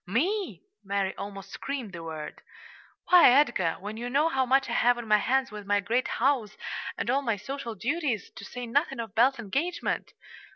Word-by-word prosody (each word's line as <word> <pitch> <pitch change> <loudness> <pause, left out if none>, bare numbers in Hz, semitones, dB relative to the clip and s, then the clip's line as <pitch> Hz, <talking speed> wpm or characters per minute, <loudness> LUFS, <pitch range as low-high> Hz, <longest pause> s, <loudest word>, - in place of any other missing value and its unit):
"Me!" 360 - -1 0.2
Mary 195 -1 -1
almost 195 -1 -8
screamed 260 -8 -5
the 170 - -7
word. 160 -2 -7 0.7
"Why, 360 -5 +9
Edgar! 240 - +3
when 205 +3 -6
you 240 +2 -4
know 290 +5 +3
how 265 -4 +1
much 270 +2 +3
I 235 - -3
have 245 +1 +3
on 240 -2 -6
my 210 0 +5
hands 265 +3 +1
with 210 -1 -8
my 205 0 +3
great 230 +6 0
house 245 -5 0 0.4
and - - -3
all 265 +3 +2
my 230 -5 0
social 235 +2 -6
duties, 255 - -2
to - - -9
say 245 +5 -6
nothing 270 +2 0
of 225 -4 -5
Belle's 260 +5 +4
engagement!" 275 - -2
240 Hz, 190 wpm, -28 LUFS, 205-275 Hz, 0.7 s, Why